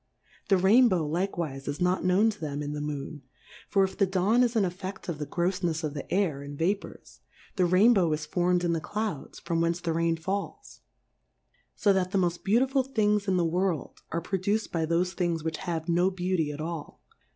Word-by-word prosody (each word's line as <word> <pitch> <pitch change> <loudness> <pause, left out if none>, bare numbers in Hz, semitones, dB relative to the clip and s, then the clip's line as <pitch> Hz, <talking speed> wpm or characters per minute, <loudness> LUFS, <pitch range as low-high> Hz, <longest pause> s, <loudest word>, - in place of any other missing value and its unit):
The 195 - +5
Rain 215 +8 +6
bow 170 -6 0
likewife 165 -5 -3
is 145 0 -3
not 180 +1 +1
known 190 +5 +3
to 210 - -12
them 145 -1 -3
in 145 0 -4
the 150 - -4
Moon; 150 0 -5 0.5
for 195 -2 +3
if 190 - -2
the 195 - +2
Dawn 195 +6 +2
is 240 -1 +2
an 220 - +3
effett 190 +1 -5
of 165 -4 -4
the 150 - -4
groffnefs 175 -2 -1
of 150 -2 -2
the 145 - -7
Air 175 -8 +1
and 145 0 -8
Vapours, 195 +6 -3 0.4
the 185 - +3
Rainbow 185 -1 +4
is 155 0 -2
form'd 180 +3 +1
in 170 -1 +1
the 165 - -1
Clouds, 210 -5 -4
from 165 -1 -2
whence 170 +1 +1
the 170 -2 -2
Rain 165 0 +1
falls; 195 +5 -5 1.0
lb 205 -2 +4
that 185 -1 +1
the 195 - 0
moft 175 -2 0
beautiful 260 +6 +3
Things 210 -5 0
in 190 -1 +2
the 175 - +2
Worid, 175 -3 -1
are 165 - -1
produced 200 +5 -1
by 165 -2 -1
thofe 175 +2 +1
Things 170 -4 -1
which 160 -1 -2
have 170 -3 -4
no 175 +2 +3
Beauty 180 -4 -1
at 145 - -8
all. 165 -1 -6
180 Hz, 205 wpm, -28 LUFS, 160-195 Hz, 1.0 s, Rain